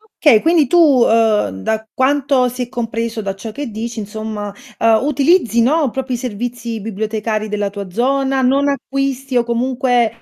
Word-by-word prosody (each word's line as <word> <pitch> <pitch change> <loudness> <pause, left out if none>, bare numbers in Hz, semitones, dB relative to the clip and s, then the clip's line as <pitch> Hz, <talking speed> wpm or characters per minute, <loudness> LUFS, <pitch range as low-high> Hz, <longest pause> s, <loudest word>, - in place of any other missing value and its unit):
Okay, 250 -9 +5
quindi 325 -3 +3
tu, 350 - +2 0.3
uhm, 220 - +2
da 220 - -2
quanto 275 -1 +2
si 250 +1 -4
è 240 - -8
compreso 230 -1 -3
da 195 -2 -4
ciò 220 +3 -7
che 280 +3 -5
dici 230 +2 -5
insomma, 210 -1 -5 0.3
uhm, 225 +2 +3
utilizzi, 280 -4 +2
no, 285 +3 +2
proprio 265 0 -3
i - - -5
servizi 240 -1 -4
bibliotecari 215 +1 -3
della 205 -1 -2
tua 200 -1 -7
zona? 270 +5 +1
Non 275 +3 +2
acquisti 275 -1 -2
o 240 - +3
comunque 240 -1 0
235 Hz, 165 wpm, -17 LUFS, 220-270 Hz, 0.3 s, Okay